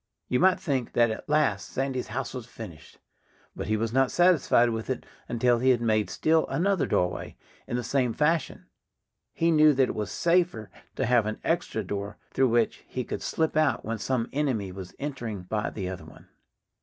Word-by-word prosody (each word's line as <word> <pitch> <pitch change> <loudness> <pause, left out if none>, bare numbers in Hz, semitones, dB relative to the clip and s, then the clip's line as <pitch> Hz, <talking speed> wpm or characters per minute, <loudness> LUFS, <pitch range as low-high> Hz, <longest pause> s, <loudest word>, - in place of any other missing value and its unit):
You 125 - +2
might 185 +1 +4
think 135 -6 -2
that 120 -1 +4
at 110 - -7
last 150 -1 +1
Sandy's 135 -1 -2
house 125 +3 -4
was 125 -3 -6
finished. 85 -11 -11 0.6
But - - -5
he 110 +1 +1
was 115 +1 -2
not 135 0 +3
satisfied 170 -9 +4
with 110 +1 -4
it 130 - -3 0.2
until 120 0 +2
he 130 +2 +3
had 125 -2 +4
made 110 -4 +1
still 160 - +2
another 190 -1 +1
doorway, 90 0 -1 0.3
in - - -3
the 125 - -1
same 125 0 +1
fashion. 155 +6 0 0.7
He 165 0 +1
knew 155 -1 +6
that 130 -2 +2
it - - -2
was 105 -2 -3
safer 170 - +1 0.2
to 130 - 0
have 120 -2 +3
an 110 - -4
extra 165 -10 -1
door 100 +1 -5
through 130 -1 +2
which 115 -1 +1
he 130 - -3
could - - -5
slip 160 -1 -1
out 155 -1 +2
when 115 0 -3
some 120 0 -1
enemy 130 -10 -1
was 95 -1 -9
entering 120 -9 -5
by 105 +3 -2
the 95 -4 -5
other 95 -1 -6
one. - - -16
125 Hz, 195 wpm, -27 LUFS, 110-150 Hz, 0.7 s, knew